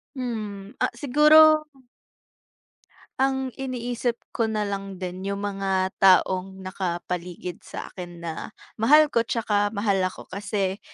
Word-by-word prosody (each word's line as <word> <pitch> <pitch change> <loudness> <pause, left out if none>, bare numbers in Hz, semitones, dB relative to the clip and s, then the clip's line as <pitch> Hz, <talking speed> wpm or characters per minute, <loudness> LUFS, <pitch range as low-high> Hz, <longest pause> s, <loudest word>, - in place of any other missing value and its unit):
Hmm. 215 -5 -5
Ah, - - +3
siguro 305 +4 +6 1.6
ang 265 -1 +1
iniisip 245 -2 -2 0.2
ko 225 -1 0
na 215 -1 -1
lang 195 -1 -4
din 185 +1 -6
'yong 200 0 -2
mga 195 -2 -1
taong 190 0 +3
nakapaligid 180 -1 -4
sa - - -7
akin 175 -2 -9
na 165 -1 -3 0.5
mahal 300 +6 +6
ko 230 - +3
'tsaka 205 -3 0
mahal 200 -2 +1
ako. - - -10
Kasi 195 0 -2
200 Hz, 120 wpm, -25 LUFS, 190-240 Hz, 1.6 s, siguro